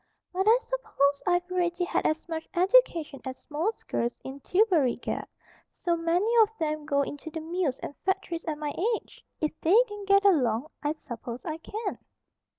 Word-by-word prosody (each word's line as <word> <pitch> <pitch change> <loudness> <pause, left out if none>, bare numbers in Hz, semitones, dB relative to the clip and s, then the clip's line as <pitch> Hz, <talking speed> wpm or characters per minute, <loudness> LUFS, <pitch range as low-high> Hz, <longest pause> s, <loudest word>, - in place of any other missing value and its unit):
"But 380 +3 0
I 460 - +7
s'pose 285 - 0
I've 355 +1 +1
already 355 -1 0
had - - +1
as 310 +2 -1
much 320 -1 -5
education 350 - +3
as 260 -1 -7
most 340 +10 -2
girls 235 +1 -1
in 265 +1 -7
Tillbury 345 - +3
get. - - -4 0.4
So 345 -1 -1
many 335 +4 +1
of 430 - +5
them 305 -2 -2
go 280 -2 +2
into 290 +3 -6
the 320 - -5
mills 320 -4 -1
and 285 - -5
factories 380 -3 -2
at 310 -3 -2
my 295 -1 -3 0.2
age. - - -11 0.2
If 310 - +1
they 355 +7 +5
can 415 -2 -8
get 395 0 +4
along, 275 - +3
I 295 0 0
suppose 240 -4 -8
I 315 0 -3
can." 410 +5 -5
330 Hz, 175 wpm, -28 LUFS, 290-370 Hz, 0.4 s, I